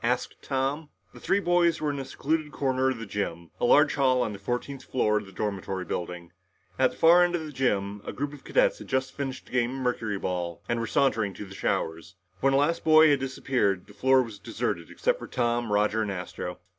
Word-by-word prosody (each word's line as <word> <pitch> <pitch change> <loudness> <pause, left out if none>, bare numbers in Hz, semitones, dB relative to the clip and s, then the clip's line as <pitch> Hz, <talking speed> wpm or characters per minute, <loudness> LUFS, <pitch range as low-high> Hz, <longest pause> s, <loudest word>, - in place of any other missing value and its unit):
asked 125 +2 -1
Tom. 140 +3 -2 0.2
The - - -12
three 200 - +1
boys 175 -3 +2
were 150 -1 0
in 140 - -4
a 135 - -4
secluded 155 +2 -2
corner 130 -2 +1
of 130 - -2
the 115 - -6
gym, 85 -5 -4
a - - +1
large 145 +3 +5
hall 130 -3 +3
on 110 - -3
the 100 - -8
fourteenth 125 +6 -4
floor 105 -4 +1
of 105 - -11
the - - -12
dormitory 95 -2 -3
building. 85 0 -5 0.5
At 130 -1 +5
the - - -14
far 170 +2 +7
end 175 0 +1
of 160 -2 -3
the 155 - -7
gym, 105 -7 -1
a - - -5
group 145 +1 -4
of 145 - -12
cadets - - +2
had - - -10
just 130 0 -1
finished 135 -2 -5
a - - -18
game 125 0 0
of 135 - -4
mercuryball 95 -7 -2
and 120 - 0
were 115 - -2
sauntering 110 -7 +1
to 105 - -7
the 95 - -11
showers. 85 0 -2 0.2
When 135 +4 +2
the - - +4
last 165 +4 +1
boy 155 -1 +7
had 140 - +3
disappeared, 130 -7 0
the 105 - -16
floor 130 +5 +4
was 110 -4 -9
deserted - - -3
except - - 0
for - - -8
Tom, 120 -2 -1
Roger 105 +2 +2
and 105 -2 -1
Astro. 90 -2 -5
125 Hz, 230 wpm, -27 LUFS, 105-140 Hz, 0.5 s, far